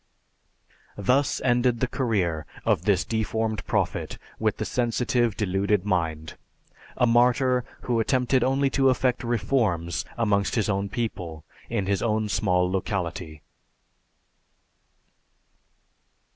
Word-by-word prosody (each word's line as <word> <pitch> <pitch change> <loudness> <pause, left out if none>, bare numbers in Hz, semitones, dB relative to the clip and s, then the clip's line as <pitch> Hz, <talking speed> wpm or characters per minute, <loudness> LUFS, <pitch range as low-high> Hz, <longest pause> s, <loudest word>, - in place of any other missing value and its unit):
Thus 125 +7 +1
ended 120 -1 +2
the 130 - +2
career 100 - -1 0.2
of 85 - +1
this 100 -2 +2
deformed 110 0 -1
Prophet - - -1 0.2
with - - 0
the - - -3
sensitive 120 -1 0
deluded 100 -1 0
mind; 80 -5 -2 0.6
a - - +4
martyr 125 +1 +3 0.2
who 120 -2 0
attempted 125 +2 +2
only 135 +1 +1
to 135 0 +3
effect 130 -1 +1
reforms 105 - 0
amongst 100 -4 +1
his 110 -3 +1
own 100 0 -1
people, 90 -9 -4 0.3
in 100 - -1
his 100 0 0
own 110 -2 0
small 90 -3 +1
locality. 90 -4 -3
110 Hz, 110 wpm, -25 LUFS, 95-125 Hz, 0.6 s, a